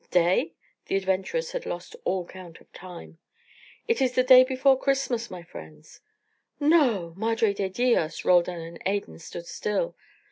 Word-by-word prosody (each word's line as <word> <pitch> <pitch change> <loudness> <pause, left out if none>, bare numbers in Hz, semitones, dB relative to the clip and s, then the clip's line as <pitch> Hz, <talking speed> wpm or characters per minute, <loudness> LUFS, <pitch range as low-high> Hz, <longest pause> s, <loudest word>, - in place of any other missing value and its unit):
"Day?" 175 -2 +2 0.3
The - - -1
adventurers 195 - -1
had - - -5
lost - - -6
all 185 -2 -1
count 180 -2 -12
of - - -24
time. 175 -2 -11 0.7
"It 460 - +1
is 255 -2 +2
the 255 - +4
day 255 0 +8
before 265 +1 +3
Christmas, 265 -3 -1
my 180 -2 -9
friends." 80 - -13 0.6
"No! 265 - +2
Madre 225 +1 +1
de 200 -1 -2
dios!" 210 -6 0
Roldan 175 -1 +3
and 165 +1 -10
Adan 200 -2 -3
stood 170 +1 -9
still. 210 - -2
200 Hz, 150 wpm, -26 LUFS, 175-255 Hz, 0.7 s, day